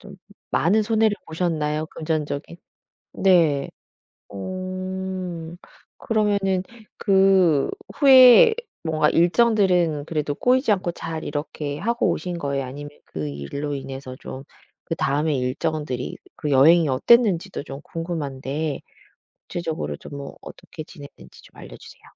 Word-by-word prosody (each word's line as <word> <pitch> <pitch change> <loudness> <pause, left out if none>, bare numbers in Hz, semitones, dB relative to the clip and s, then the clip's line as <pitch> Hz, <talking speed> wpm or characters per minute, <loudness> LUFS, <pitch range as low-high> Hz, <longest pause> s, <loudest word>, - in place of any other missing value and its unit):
좀 200 - -13
좀 190 - -12 0.3
많은 205 +7 +2
손해를 220 -1 +2
보셨나요? 160 -2 -1
금전적인? 155 0 -4 0.6
네. 165 -7 +3 0.6
어 185 - -5 0.4
그러면은 200 -4 0 0.3
그 190 -7 +3 0.3
후에 270 - +8 0.3
뭔가 155 -2 +2
일정들은 175 -5 +2
그래도 150 -3 -2
꼬이지 250 - +2
않고 185 -3 0
잘 160 -2 -6
이렇게 145 -1 -4
하고 235 +6 0
오신 175 -2 -3
거예요? 140 -2 -2
아니면 145 +3 -8 0.2
그 75 -2 -5
일로 105 - -5
인해서 135 -1 -7
좀 135 +1 -8 0.4
그다음에 150 -1 0
일정들이 135 +1 -3 0.2
그 150 - -4
여행이 155 +4 +5
어땠는지도 190 - +3
좀 135 -1 -8
궁금한데 150 -3 -4 0.7
구체적으로 160 - -4
좀 - - -12
뭐 140 -1 -8
어떻게 155 - -10
지냈는지 145 -3 -14
좀 - - -20
알려 - - -11
주세요. - - -15
165 Hz, 275 characters per minute, -23 LUFS, 145-190 Hz, 0.7 s, 후에